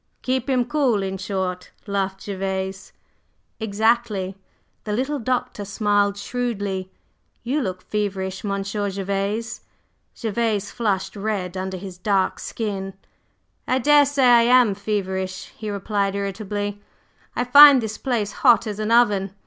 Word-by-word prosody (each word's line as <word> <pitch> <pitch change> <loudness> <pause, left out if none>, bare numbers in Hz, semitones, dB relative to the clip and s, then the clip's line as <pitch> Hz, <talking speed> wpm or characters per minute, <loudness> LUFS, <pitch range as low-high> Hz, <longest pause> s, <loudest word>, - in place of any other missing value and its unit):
"Keep 260 +1 -1
him 250 -2 +2
cool, 250 -7 +1
in 190 0 -4
short!" 185 -2 -3 0.2
laughed 195 -2 -2
Gervase. 190 -1 -4 0.7
"Exactly!" 220 -2 0 0.5
The 210 - -3
little 270 +6 -1
Doctor 245 -3 -2
smiled 205 0 +1
shrewdly. 205 -5 -3 0.5
"You 275 +5 0
look 185 -5 -4
feverish, 195 -2 -3
Monsieur 200 0 -2
Gervase." 200 +3 -3 0.6
Gervase 220 -2 -1
flushed 205 -6 -1
red 200 -3 -3
under 190 0 -4
his 185 -1 -9
dark 195 -2 +1
skin. 195 -4 -4 0.7
"I 255 - +2
daresay 285 +1 +4
I 240 -2 +7
am 240 -2 +5
feverish," 190 -2 -3
he 215 - -6
replied 200 0 -1
irritably, 205 +1 -3 0.5
"I 245 - +1
find 280 +2 +9
this 220 -2 -4
place 230 -6 -1
hot 240 -1 +4
as 210 -1 -5
an 215 0 -2
oven. 205 -5 +3
205 Hz, 125 wpm, -22 LUFS, 195-235 Hz, 0.7 s, find